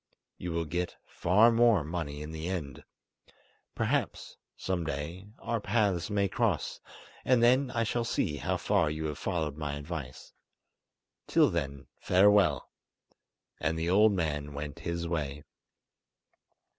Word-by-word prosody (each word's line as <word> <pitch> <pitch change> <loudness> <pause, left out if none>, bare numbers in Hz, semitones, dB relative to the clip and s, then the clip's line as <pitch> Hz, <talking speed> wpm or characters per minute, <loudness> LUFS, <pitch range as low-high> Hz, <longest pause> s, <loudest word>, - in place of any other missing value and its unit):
You 90 - -4
will 85 0 -1
get 90 +3 -3
far 105 +7 +4
more 115 -6 +4
money 75 -2 -4
in 75 - -7
the 80 +1 -5
end. 80 -7 -4 0.9
Perhaps, - - -1 0.2
some 95 -2 -2
day, 80 +6 -5
our 115 -2 -3
paths 100 -5 +1
may 100 -1 +1
cross, - - -1 0.4
and 125 -2 +3
then 130 +3 +4
I 120 -2 0
shall 115 +2 -1
see 90 -9 -1
how - - -1
far 80 - +2
you 80 +1 -3
have 75 -1 -4
followed 80 -6 -2
my 75 -2 -3
advice. 70 -3 -7 0.9
Till - - +4
then, 70 -5 -3
farewell"; 95 -6 +4 0.9
and 80 +1 -1
the 85 +2 -1
old 105 +2 +5
man 75 -5 -2
went 75 0 -6
his 85 0 -3
way. 75 -4 -3
85 Hz, 135 wpm, -30 LUFS, 75-100 Hz, 0.9 s, old